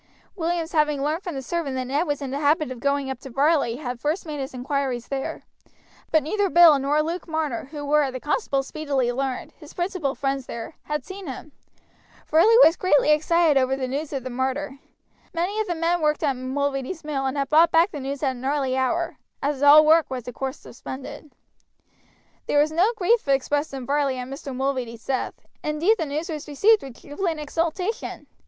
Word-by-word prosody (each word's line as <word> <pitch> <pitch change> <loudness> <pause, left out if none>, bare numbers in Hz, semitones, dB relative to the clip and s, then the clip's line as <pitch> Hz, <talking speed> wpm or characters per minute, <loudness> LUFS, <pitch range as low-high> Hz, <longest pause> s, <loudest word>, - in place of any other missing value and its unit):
Williams 335 -2 -2
having 300 -3 +1
learned 310 +4 -1
from 350 -5 -5
the 270 - -4
servant 300 -2 -2
that 255 -1 -2
Ned 285 +7 0
was 290 -1 -2
in 265 - -4
the 280 - -2
habit 300 -1 +2
of 255 - -7
going 280 0 0
up 260 - -6
to 270 - -10
Varley 280 -1 +2
had 245 -3 -5
first 310 +7 -1
made 300 -2 -5
his 270 +1 -4
inquiries 255 -1 -3
there; 270 -1 -4 0.7
but 315 -1 +4
neither 400 +6 0
Bill 335 -4 +7
nor 290 +3 +1
Luke 335 +3 -4
Marner, 315 -7 -2
who 290 +1 -7
were, 295 -1 +3
the 255 0 -6
constable 285 - 0
speedily 275 -4 -1
learned, 265 0 -3
his 300 -2 -14
principal 350 -6 -2
friends 270 -1 -2
there, 235 +7 -6
had 300 -3 -3
seen 380 -1 -8
him. 270 +3 -7 0.7
Varley 425 +9 +5
was 330 - +6
greatly 300 -5 +3
excited 310 -1 +3
over 260 +1 +1
the 265 -1 -3
news 285 +4 -3
of 270 -3 -3
the 255 - -5
murder. 265 +2 -2 0.6
Many 365 +6 -1
of 435 - -1
the 350 - -1
men 335 +1 0
worked 300 +1 +1
at 280 -3 +1
Mulready's 275 +5 -3
mill, 280 -3 -2
and 265 +2 -3
had 275 -1 -1
brought 325 +2 +6
back 335 +4 +4
the 295 - -6
news 275 +2 -5
at 270 - +2
an 245 - -10
early 270 -1 0
hour, 330 +6 -1 0.3
as 280 -1 -1
all 295 +2 +8
work 320 +1 +5
was 255 -3 -5
of 245 - -5
course 265 +2 -4
suspended. 280 +4 -9 1.2
There - - +1
was 300 +1 +4
no 360 +8 +3
grief 430 0 +2
expressed 285 +2 +1
in 265 -2 -6
Varley 280 -1 0
at 250 0 -5
Mr. 275 0 -7
Mulready's 255 -4 -3
death, 265 -2 -2 0.3
indeed 325 +9 +2
the 320 - -1
news 305 +4 -3
was 310 -3 -6
received 405 +9 +4
with 265 -3 -10
jubilant 320 +2 -3
exultation. 340 +9 -3
290 Hz, 200 wpm, -24 LUFS, 270-320 Hz, 1.2 s, all